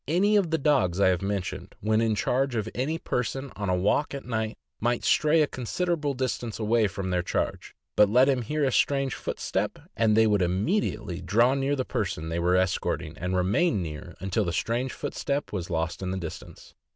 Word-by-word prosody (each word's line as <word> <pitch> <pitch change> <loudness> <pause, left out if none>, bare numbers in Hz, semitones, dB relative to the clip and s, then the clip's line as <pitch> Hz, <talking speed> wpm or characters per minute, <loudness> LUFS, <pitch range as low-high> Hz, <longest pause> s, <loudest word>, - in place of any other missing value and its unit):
Any 190 +7 +3
of 195 -5 +3
the 160 - +1
dogs 105 - +2
I 100 - +5
have 90 -2 +1
mentioned, 95 -1 -4
when 110 +1 +2
in 110 -2 +2
charge 130 +4 0
of 110 -1 -1
any 145 +6 -1
person 135 -1 -3
on 100 -2 -3
a 90 - +3
walk 105 +11 +1
at 140 - -7
night, 110 -2 -2 0.2
might 120 +1 0
stray 155 +1 +4
a - - +1
considerable 145 +3 -2
distance 120 -3 -2
away 110 0 +2
from 95 -1 -4
their 90 -1 +1
charge; 85 - -3 0.2
but 105 -1 +6
let 125 +5 +6
them 135 -2 +2
hear 150 +6 -1
a 135 - +2
strange 135 0 +2
footstep, - - -2 0.2
andj, 110 -2 +3
they 110 0 +5
would 105 -2 +3
immediately 95 - -1
draw 115 +8 +3
near 140 +1 0
the 130 -2 -2
person 80 +1 -3
they 85 +1 -1
were 90 +1 +2
escorting, 90 -3 0
and 90 +1 -2
remain 100 - +2
near 80 +2 -7
until 95 +3 0
the 85 -3 -2
strange 120 +6 -1
footstep 145 -2 -3
was 90 -4 -3
lost 80 +1 -2
in 95 - -3
the 95 - -2
distance. 85 -4 -8
110 Hz, 200 wpm, -27 LUFS, 95-135 Hz, 0.2 s, but